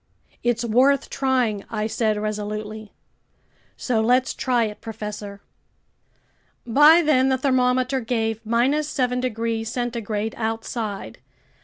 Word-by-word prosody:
"It's 240 0 0
worth 255 +4 +3
trying!" 255 -7 0
I 215 -2 -2
said 220 -1 0
resolutely. 215 0 -5 0.9
"So 235 -4 0
let's 250 +3 +2
try 245 -3 +1
it, 210 -1 -5
professor." 210 -2 -7 1.2
By 295 +8 +6
then 265 -4 +3
the 260 - +2
thermometer 255 0 +1
gave 225 -2 -2
7 255 +1 +1
degrees 225 -2 -2
centigrade 225 -3 -3
outside. 225 -2 -4
230 Hz, 105 wpm, -23 LUFS, 215-255 Hz, 1.2 s, By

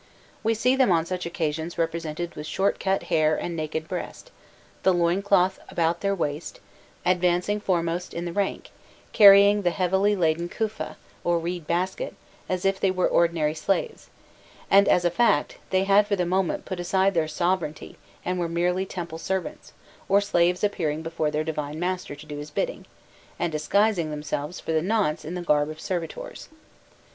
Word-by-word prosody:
We 225 +1 +1
see 250 +4 +2
them 260 -7 +3
on 165 -2 +3
such 180 0 -4
occasions 160 0 -3
represented 165 0 -3
with 150 - -7
short 195 +5 0
cut 195 0 0
hair 155 -1 +3
and 170 +2 -4
naked 155 0 -3
breast, 185 - -6 0.5
the 190 -1 +3
loin 175 +2 +2
cloth 195 -2 +2
about 170 0 0
their 200 0 +1
waist, 150 -3 -4 0.5
advancing 180 +3 +2
foremost 175 -3 -1
in 170 +1 -4
the 170 - -4
rank, 200 0 -2 0.4
carrying 200 -1 +8
the 180 - +2
heavily 190 +3 +1
laden 170 -1 0
"kufa," 220 +2 -4 0.3
or 175 0 +2
reed 170 -1 -4
basket, 185 - -2 0.3
as 185 0 -2
if 195 0 +2
they 195 - +2
were 185 -1 +1
ordinary 165 -3 +2
slaves; 195 - -2 0.6
and, 200 0 +6
as 175 - +3
a 175 - +3
fact, 175 -7 +2
they 190 0 +2
had 200 +1 +4
for 205 - +1
the 180 -2 0
moment 185 +1 0
put 185 -2 -5
aside 190 +2 +2
their 165 -3 +1
sovereignty 170 0 -2 0.3
and 180 0 -1
were 170 -1 -1
merely 180 +3 0
temple 170 -3 -6
servants, 190 - -4 0.4
or 200 +1 +5
slaves 180 -2 +1
appearing 160 -6 -1
before 165 -2 -1
their 150 +1 -1
divine 150 -1 -4
master 180 -3 -3
to 150 +2 -12
do 150 -1 -7
his 150 +1 -7
bidding, - - -3 0.5
and 175 - -1
disguising 180 +2 +1
themselves 150 +2 -4
for - - -4
the 160 -1 +2
nonce 195 -4 0
in 165 +4 -5
the 180 - -4
garb 150 -2 +2
of 155 0 -8
servitors. 185 - -5
175 Hz, 175 wpm, -25 LUFS, 160-195 Hz, 0.6 s, carrying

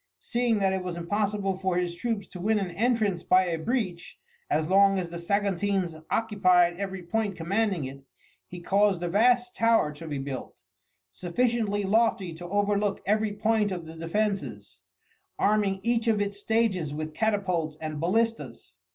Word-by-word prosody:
Seeing 240 -2 0
that 195 -1 +1
it 190 - -1
was 180 -1 -4
impossible 195 +2 -1
for 190 -2 0
his 175 -1 -1
troops 200 +3 -3
to 180 - -9
win 215 +4 +1
an 195 -3 -2
entrance 215 -3 +1
by 185 +1 +4
a 165 -2 -2
breach, 185 -3 -3 0.3
as 155 +1 +1
long 195 +1 +5
as 175 -2 -3
the 170 - -6
Saguntines 195 -1 0 0.2
occupied 185 -6 +3
every 190 -2 -5
point 205 +2 -1
commanding 190 0 0
it, 135 +1 -7 0.5
he 175 0 -9
caused 195 -1 +2
a - - 0
vast 245 +5 +3
tower 230 -9 +3
to 160 +2 -10
be 145 -2 -3
built, 135 -1 -6 0.6
sufficiently 205 - 0
lofty 200 -3 +1
to 175 +2 -9
overlook 205 0 0
every 215 +1 +1
point 215 0 +1
of 175 -3 -4
the 160 - -9
defences, 165 - -3 0.6
arming 205 -2 +2
each 235 0 +1
of 220 -2 +3
its 200 0 -2
stages 200 -9 0
with 155 0 -5
catapults 185 -8 -1
and 155 -1 -5
ballistas. 170 - -2
195 Hz, 160 wpm, -27 LUFS, 170-215 Hz, 0.6 s, long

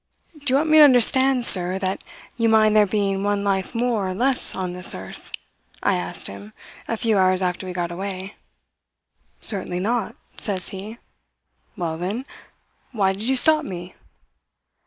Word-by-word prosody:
"'Do 295 -1 -19
you 260 - +2
want 310 +3 -1
me 310 - +6
to - - +9
understand, 260 -1 +5
sir, 180 -2 +6
that 190 0 -4 0.3
you 230 -1 0
mind 215 -1 +3
there 210 -1 +4
being 195 -1 -1
one 205 0 -1
life 195 +2 -2
more 230 -5 -1
or 185 - -5
less 255 +4 +1
on 185 -2 -4
this 180 0 +3
earth?' 95 0 -11 0.5
I - - +1
asked - - -5
him, 100 +2 -9 0.3
a 230 - -3
few 220 -3 0
hours 185 0 +2
after 180 +1 -3
we 180 - -6
got 175 -1 -4
away. 190 +2 -7 1.1
"'Certainly 185 -4 -4
not,' 225 +1 -2 0.2
says 190 -4 -2
he. 205 +4 -9 0.8
"'Well, 165 -2 -4
then, 205 +9 -4 0.7
why 195 -6 0
did 195 - -10
you 260 +4 -1
stop 310 +4 +4
me?' 180 -7 -8
200 Hz, 165 wpm, -21 LUFS, 185-235 Hz, 1.1 s, to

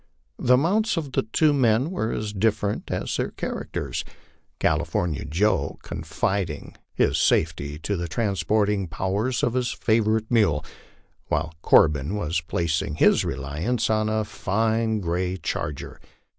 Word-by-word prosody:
The 125 +1 +5
mounts 195 +8 +1
of 150 -5 -3
the - - +1
two 145 +8 +2
men 130 +2 +2
were 115 -12 -1
as 105 -1 -3
different 105 0 0
as - - -2
their - - -1
characters, - - -4 0.5
California 85 -6 0
Joe 80 -3 +1
confiding 95 -6 -3 0.2
his - - +1
safety 75 -2 +1
to 100 +6 -2
the 85 -1 -3
transporting 100 +1 0
powers 100 +8 -1
of 120 - +2
his 125 -1 0
favorite 110 0 +1
mule, 100 -11 +3 0.6
while 80 +2 -1
Corbin 75 +5 +4
was 85 -4 -1
placing 80 -2 -1
his - - +4
reliance 85 - -2
upon 110 0 +1
a 110 0 +1
fine 110 +2 0
gray 90 +1 -1
charger. 75 -5 -4
105 Hz, 130 wpm, -24 LUFS, 85-115 Hz, 0.6 s, The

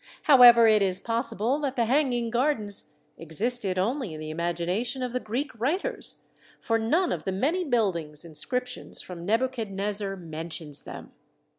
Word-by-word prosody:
However, 245 -5 +8
it 215 -2 +5
is 190 -1 +1
possible 230 +3 -1
that 275 -3 -2
the 235 - +2
hang 270 +3 +2
ing 235 -1 -1
gardens 235 -5 -1 0.3
existed 195 +4 0
only 220 - -1
in - - -8
the 155 0 -6
imagination 175 - -2
of 250 -1 -3
the 250 - 0
Greek 250 +6 -3
writers, 360 - -1 0.4
for 225 0 0
none 325 +12 +1
of - - -3
the 190 - -2
many 300 - 0
building 195 - 0
in 165 -2 -12
scriptions 250 - -3
from 175 -1 -8
Nebuchadnezzar 210 -4 -1
mentions 160 -3 -7
them. - - -9
225 Hz, 155 wpm, -27 LUFS, 185-250 Hz, 0.4 s, However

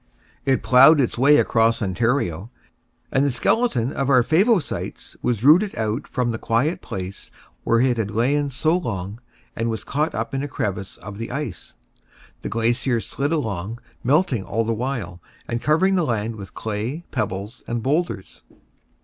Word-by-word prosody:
It 135 -1 +2
ploughed 135 +5 +7
its 125 - +1
way 140 +4 +5
across 115 -3 +3
Ontario, 110 - -1 0.6
and 135 - +2
the 145 - +2
skeleton 130 - +1
of 135 0 -1
our 125 -3 +5
Favosites 185 - 0
was 120 -3 -1
rooted 175 +9 +5
out 110 +5 -2
from 125 -2 -1
the 110 - -4
quiet 125 +9 0
place 95 +1 -7 0.3
where 115 - +3
it 125 -2 +2
had 110 -3 -1
lain 140 +7 +1
so 155 +5 +1
long, 105 - -4 0.4
and 115 0 -1
was 110 -2 -3
caught 150 +3 -1
up 115 +3 -3
in 135 - -1
a 145 - -3
crevice 100 -7 -4
of 105 0 -9
the 115 - -4
ice. 125 -7 -5 0.7
The - - -4
glacier 115 +2 +1
slid 140 +6 -3
along, 110 - -2 0.3
melting 140 - +2
all 115 +4 -1
the 115 +1 -1
while, 110 -7 -4 0.3
and 115 0 -2
covering 175 +6 +3
the 180 -2 +2
land 115 -4 -1
with 100 -3 -10
clay, 110 +10 -4
pebbles, 100 +6 -4
and 115 -1 -2
boulders. 150 - -2
120 Hz, 165 wpm, -22 LUFS, 110-145 Hz, 0.7 s, ploughed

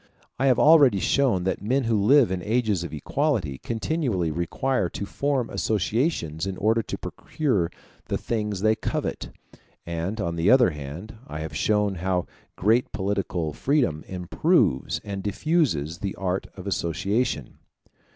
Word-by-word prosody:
I 135 - +3
have 130 - +4
already 145 -9 +6
shown 120 -6 +2
that 95 0 -1
men 130 +6 +1
who 115 -1 +1
live 130 +1 +5
in 95 -1 -2
ages 105 -2 0
of 85 - -6
equality 90 - -1
continually 115 - -1
require 90 - -1
to 100 - -5
form 140 0 -1
associations 100 - -1
in 95 -1 -4
order 110 +2 +2
to - - -5
procure 105 - -1 0.4
the - - -2
things 105 -4 -2
they 110 +1 +4
covet; - - -3 0.6
and, 85 +6 -3
on 85 -4 -2
the 85 +4 +2
other 125 -6 +6
hand, 75 +9 -8
I 75 +1 -6
have 80 -2 -6
shown 105 +5 +1
how 90 -1 0 0.3
great 110 +6 +2
political 95 -5 -2
freedom 125 - 0
improves 90 -7 +1
and 100 -1 -5
diffuses 100 - 0
the 100 -1 -3
art 95 0 -2
of 95 - -8
association. 95 - -1
100 Hz, 145 wpm, -25 LUFS, 85-120 Hz, 0.6 s, already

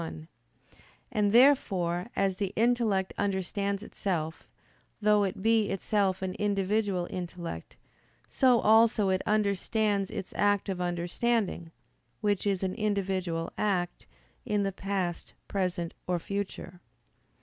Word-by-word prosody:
1); 160 -1 -7 0.8
and 205 -1 +2
therefore, 195 -9 +4
as 195 -1 +1
the 195 -2 -2
intellect 225 -5 +2
understands 200 +1 -1
itself, 165 -7 -3 0.5
though 210 -1 +4
it 190 -1 -3
be 225 -2 +3
itself 195 -1 0
an 185 -1 -2
individual 200 -2 0
intellect, 170 - -6 0.5
so 250 -3 +4
also 220 -1 +5
it 185 0 +1
understands 205 -1 +1
its 190 - -6
act 205 -1 +2
of 185 -2 -2
understanding, 175 +2 -1 0.5
which 205 -1 0
is 195 -2 0
an 185 -1 -1
individual 190 -6 -1
act, 180 -4 -1 0.4
in 210 -3 0
the 195 - 0
past, 190 -3 -3
present, 180 -3 -2
or 180 -1 +1
future. 185 -1 -5
195 Hz, 115 wpm, -29 LUFS, 180-210 Hz, 0.8 s, also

